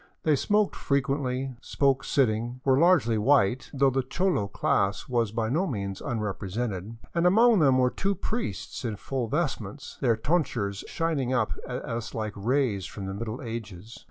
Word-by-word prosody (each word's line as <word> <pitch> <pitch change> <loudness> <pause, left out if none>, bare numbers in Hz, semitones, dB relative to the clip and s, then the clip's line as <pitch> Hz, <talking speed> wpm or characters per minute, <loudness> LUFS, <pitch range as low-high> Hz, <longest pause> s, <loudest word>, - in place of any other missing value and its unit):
They 155 -2 +4
smoked 210 +8 +1
frequently, 135 -1 -1
spoke 135 -1 +1
sitting, 120 -1 0
were 135 0 +4
largely 145 -11 +4
white, 125 0 +3
though 135 -1 +3
the 135 +1 +1
cholo 175 - 0
class 100 0 0
was 120 -4 0
by 110 0 -1
no 165 +11 +1
means 100 -6 -4
unrepresented, 105 -1 -3 0.2
and 170 +1 +3
among 225 +3 +5
them 135 -4 +5
were 125 -1 +3
two 195 +1 -1
priests 190 - -4
in 115 -3 -2
full 125 +3 -3
vestments, - - -3
their 115 -2 +3
tonsures 115 - -1
shining 150 -7 -1
up 115 -4 +1 0.2
at 125 -1 -4
us 115 -1 -4
like 110 -2 -3
rays 110 -3 0
from 100 - -7
the 95 - -4
Middle 110 +5 -5
Ages. 115 -2 -7
125 Hz, 160 wpm, -27 LUFS, 110-140 Hz, 0.2 s, among